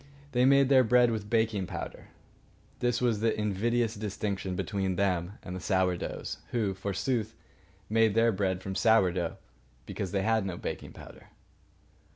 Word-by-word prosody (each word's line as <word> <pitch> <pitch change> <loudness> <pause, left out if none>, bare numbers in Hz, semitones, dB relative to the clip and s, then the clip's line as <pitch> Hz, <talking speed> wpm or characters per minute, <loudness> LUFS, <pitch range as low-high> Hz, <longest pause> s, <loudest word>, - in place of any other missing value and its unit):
They 125 -1 +3
made 140 0 +5
their 130 -2 +6
bread 125 0 +4
with 105 -2 -4
baking 110 -4 +1
powder. - - -7 0.7
This 120 0 0
was 120 -4 +1
the 110 0 0
invidious 110 +3 0
distinction 100 -3 -3
between 95 -1 -2
them 90 -1 0
and 90 - -6
the - - -4
Sour 95 -1 +1
doughs, - - -5
who, 110 -5 0
forsooth, 105 +4 -2 0.5
made 110 -1 +3
their 115 +1 +4
bread 95 -2 -1
from 95 - -4
sour 105 -2 +4
dough 85 -2 -3 0.5
because 95 - -4
they 100 -1 0
had 110 0 +2
no 95 -3 -4
baking - - -6
powder. - - -13
105 Hz, 160 wpm, -29 LUFS, 95-115 Hz, 0.7 s, their